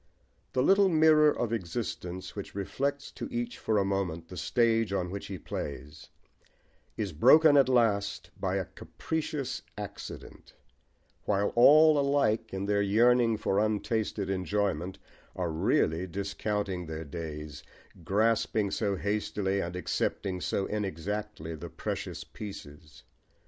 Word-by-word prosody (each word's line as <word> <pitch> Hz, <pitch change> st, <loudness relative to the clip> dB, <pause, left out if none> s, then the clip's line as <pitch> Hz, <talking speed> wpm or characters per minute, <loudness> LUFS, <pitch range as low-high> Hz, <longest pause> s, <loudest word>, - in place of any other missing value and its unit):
The 130 Hz, -, +2 dB
little 195 Hz, +4 st, +5 dB
mirror 155 Hz, -2 st, +6 dB
of 120 Hz, -5 st, -1 dB
existence, 90 Hz, -2 st, -4 dB
which 100 Hz, -2 st, -7 dB
reflects 140 Hz, +8 st, -2 dB
to -, -, -6 dB
each 240 Hz, -1 st, -4 dB
for 110 Hz, -, 0 dB
a 100 Hz, -, +2 dB
moment 90 Hz, -4 st, -2 dB
the 90 Hz, -, -8 dB
stage 115 Hz, +3 st, +1 dB
on 90 Hz, -2 st, -1 dB
which 100 Hz, 0 st, -6 dB
he 95 Hz, -, -5 dB
plays, 75 Hz, -2 st, -7 dB, 0.9 s
is 100 Hz, -5 st, -3 dB
broken 155 Hz, -, +6 dB
at 135 Hz, -2 st, +5 dB
last 105 Hz, -5 st, +1 dB
by -, -, -1 dB
a -, -, -1 dB
capricious 155 Hz, -4 st, -4 dB, 0.2 s
accident; -, -, -9 dB, 0.7 s
while 100 Hz, 0 st, +1 dB
all 150 Hz, +5 st, +7 dB
alike, 140 Hz, -6 st, +1 dB
in 95 Hz, +1 st, -3 dB
their 100 Hz, 0 st, +2 dB
yearning 115 Hz, +3 st, +4 dB
for 100 Hz, -1 st, 0 dB
untasted 110 Hz, -1 st, -1 dB
enjoyment, 95 Hz, -2 st, -1 dB, 0.4 s
are 90 Hz, -3 st, -2 dB
really 80 Hz, +2 st, +1 dB
discounting 100 Hz, -1 st, -3 dB
their 80 Hz, 0 st, -5 dB
days, 75 Hz, -1 st, -7 dB, 0.4 s
grasping 110 Hz, +2 st, +1 dB
so 100 Hz, -3 st, 0 dB
hastily 100 Hz, -1 st, -1 dB
and 85 Hz, +1 st, -4 dB
accepting 90 Hz, 0 st, -2 dB
so 95 Hz, -, -1 dB
inexactly 105 Hz, -2 st, -4 dB
the 80 Hz, +2 st, -7 dB
precious -, -, -5 dB
pieces. 75 Hz, -7 st, -10 dB
100 Hz, 130 wpm, -29 LUFS, 90-115 Hz, 0.9 s, all